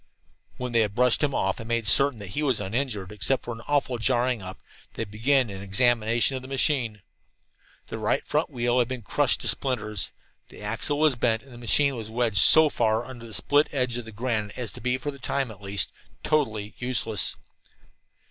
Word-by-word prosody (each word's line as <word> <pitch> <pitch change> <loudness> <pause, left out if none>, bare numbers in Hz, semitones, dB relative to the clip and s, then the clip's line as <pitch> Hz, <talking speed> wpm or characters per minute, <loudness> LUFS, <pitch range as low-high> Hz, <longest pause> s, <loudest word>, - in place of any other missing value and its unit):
When 125 -1 -4
they 115 - +2
had 105 -2 0
brushed 125 0 +3
him 145 -3 0
off - - -1
and 115 - -8
made 115 -1 -1
certain 140 +4 +5
that 100 -3 -9
he 100 - -3
was 135 -6 +1
uninjured, 105 -1 -3
except 105 +5 0
for 120 - -4
an 115 - -10
awful 140 -4 0
jarring 125 0 +1
up, 95 0 -9 0.4
they - - -3
began 115 +3 +1
an 95 -1 -8
examination 115 +4 +2
of 130 - -5
the 130 - -11
machine. 130 -6 0 0.8
The - - -7
right - - 0
front - - 0
wheel 120 0 0
had 120 - +2
been 130 -2 -6
crushed - - +1
to - - -1
splinters, 110 -7 +1 0.4
the - - -12
axle 115 +7 -2
was 155 -1 +4
bent, 115 -2 0
and 135 - -18
the 120 - -11
machine 140 +4 +3
was 110 -2 -7
wedged 115 -2 0
so 160 +9 +8
far 115 -4 0
under 120 -3 -10
a 110 - -9
split 145 +6 +2
edge 125 -4 -1
of 120 - -8
the 110 - -10
granite 110 -2 -3
as 120 -5 -4
to - - -11
be, 125 0 0
for 145 +3 -4
the 140 - -13
time 135 -1 -2
at 100 -2 -14
least, 100 0 0 0.3
totally 110 -9 -1
useless. 120 -4 -1
120 Hz, 205 wpm, -25 LUFS, 110-130 Hz, 0.8 s, so